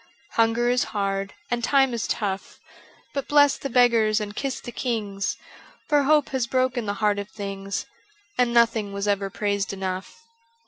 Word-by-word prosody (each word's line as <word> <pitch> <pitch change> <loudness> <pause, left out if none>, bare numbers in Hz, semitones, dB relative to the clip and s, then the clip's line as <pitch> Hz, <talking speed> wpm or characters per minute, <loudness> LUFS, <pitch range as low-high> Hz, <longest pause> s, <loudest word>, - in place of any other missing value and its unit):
Hunger 230 +1 +2
is 250 +1 +2
hard 195 0 -1 0.2
and 240 -1 0
time 270 0 +3
is 230 - -2
tough, 195 -3 -3 0.5
But 275 -2 -3
bless 290 -1 +5
the 275 - -4
beggars 230 -3 +4
and 205 -1 -5
kiss 275 +1 -2
the 240 - -8
kings. 205 -7 -2 0.5
For 295 -1 +4
hope 300 0 +4
has 260 -3 -1
broken 255 -2 0
the 205 - -1
heart 205 -1 +2
of 200 0 -6
things, 195 -1 -5 0.5
And 245 -1 +2
nothing 230 -3 +3
was 200 +1 -2
ever 200 -1 +1
praised 200 0 -1
enough. 190 - -5
225 Hz, 165 wpm, -24 LUFS, 200-250 Hz, 0.5 s, bless